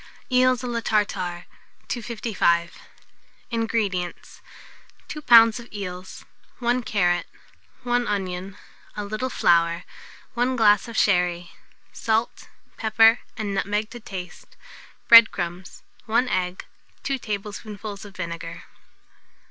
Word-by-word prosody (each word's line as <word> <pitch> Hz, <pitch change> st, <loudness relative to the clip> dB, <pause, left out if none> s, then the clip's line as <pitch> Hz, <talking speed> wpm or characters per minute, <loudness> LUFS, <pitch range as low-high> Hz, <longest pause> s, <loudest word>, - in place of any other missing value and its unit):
EELS 255 Hz, 0 st, +3 dB
A -, -, -3 dB
LA 235 Hz, -1 st, -2 dB
TARTARE. 190 Hz, -6 st, -1 dB, 0.4 s
255. 215 Hz, -7 st, -1 dB, 0.8 s
INGREDIENTS. 220 Hz, -6 st, -2 dB, 0.7 s
2 300 Hz, -, -7 dB
lbs. 230 Hz, -3 st, +7 dB
of 235 Hz, -, -13 dB
eels, 185 Hz, -2 st, -7 dB, 0.3 s
1 245 Hz, +1 st, 0 dB
carrot, 175 Hz, -7 st, 0 dB, 0.6 s
1 245 Hz, 0 st, 0 dB
onion, 190 Hz, -1 st, -3 dB, 0.4 s
a 210 Hz, -, -3 dB
little 215 Hz, +5 st, -3 dB
flour, 170 Hz, -5 st, +2 dB, 0.5 s
1 250 Hz, +1 st, 0 dB
glass 210 Hz, -3 st, +4 dB
of 230 Hz, -1 st, -7 dB
sherry; 180 Hz, -3 st, +1 dB, 0.4 s
salt, 225 Hz, +1 st, -1 dB, 0.3 s
pepper, 225 Hz, +1 st, +5 dB, 0.2 s
and 210 Hz, -3 st, -3 dB
nutmeg 210 Hz, +2 st, -1 dB
to 240 Hz, -, -8 dB
taste; 180 Hz, -5 st, -9 dB, 0.5 s
bread 230 Hz, -1 st, +10 dB
crumbs, 175 Hz, +1 st, -6 dB, 0.2 s
1 230 Hz, +3 st, +2 dB
egg, 180 Hz, -3 st, -2 dB, 0.4 s
2 275 Hz, -1 st, -2 dB
tablespoonfuls 210 Hz, -1 st, -6 dB
of 200 Hz, -2 st, -12 dB
vinegar. 170 Hz, -1 st, -6 dB
210 Hz, 110 wpm, -24 LUFS, 180-230 Hz, 0.8 s, bread